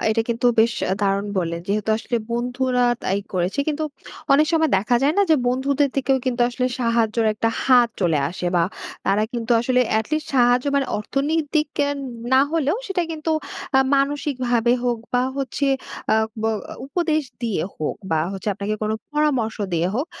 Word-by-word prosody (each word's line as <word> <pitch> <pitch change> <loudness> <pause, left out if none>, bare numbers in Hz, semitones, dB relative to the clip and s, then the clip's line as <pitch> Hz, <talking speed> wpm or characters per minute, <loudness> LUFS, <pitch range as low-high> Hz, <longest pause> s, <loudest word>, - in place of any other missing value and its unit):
এটা 225 +1 +2
কিন্তু 235 +1 0
বেশ 230 0 +3 0.3
দারুন 200 0 +1
বললেন। 170 -1 -2
যেহেতু 210 +1 0
আসলে 235 +2 -2
বন্ধুরা 250 +1 0 0.2
তাই 195 - 0
করেছে। 185 +5 -1
কিন্তু 310 +1 -1 0.5
অনেক 300 +3 +5
সময় 320 -1 +3
দেখা 215 +5 +2
যায় 285 +2 +3
না - - +6
যে, - - +7
বন্ধুদের 275 +3 +1
থেকেও 270 0 +2
কিন্তু 250 -1 -1
আসলে 250 +1 -1
সাহায্যের 230 -1 +1
একটা 225 - 0 0.2
হাত 245 -2 +5
চলে 165 -5 +2
আসে, 180 0 -5
বা 170 - +4 0.4
তারা 200 +2 +3
কিন্তু 235 -2 -4
আসলে 250 +1 +2 0.2
এট 220 - -2
লিস্ট 310 0 0
সাহায্য, 245 0 +4
মানে 275 - +1
অর্থনৈতিক 295 +6 0 0.6
না 260 - +7
হলেও, 320 +3 +1
সেটা 380 -3 0
কিন্তু 320 0 -3 0.5
আ - - +7 0.2
মানসিকভাবে 260 -4 +1
হোক, 240 -1 +1 0.2
বা 245 - +4
হচ্ছে 275 +1 -1 0.5
আ - - +5 0.3
ব - - -2 0.4
উপদেশ 310 +1 0 0.2
দিয়ে 220 -9 -1
হোক, 155 - -3
বা 160 -1 +2
হচ্ছে 195 +2 -4
আপনাকে 205 +2 -2
কোন 215 - 0 0.2
পরামর্শ 290 -7 +1 0.2
দিয়ে 170 +1 +1
হোক, 270 +7 -1
245 Hz, 165 wpm, -22 LUFS, 220-280 Hz, 0.6 s, যে